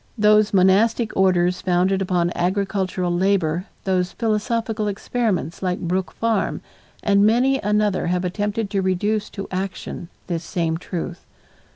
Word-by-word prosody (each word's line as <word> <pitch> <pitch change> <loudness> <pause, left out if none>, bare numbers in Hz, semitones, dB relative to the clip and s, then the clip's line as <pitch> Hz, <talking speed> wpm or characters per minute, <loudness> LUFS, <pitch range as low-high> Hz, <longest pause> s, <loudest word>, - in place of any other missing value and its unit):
Those 210 0 +4
monastic 210 +4 +3
orders 180 -1 +2
founded 185 +1 +1
upon 180 -2 +1
agricultural 185 -1 -1
labor, 180 -2 +1 0.2
those 185 -2 0
philosophical 225 -1 -1
experiments 205 - -2
like 180 -1 -1
Brook 185 +2 -1
Farm 225 -3 -1 0.4
and 200 -1 +4
many 250 +5 +3
another 210 -3 +1
have 180 +1 0
attempted 205 +3 -2
to 195 - +1
reduce 205 +3 0
to 195 -1 -7
action 185 -2 -5 0.2
this 170 -2 -3
same 165 -2 -1
truth. 175 -1 -5
195 Hz, 130 wpm, -22 LUFS, 180-210 Hz, 0.4 s, Those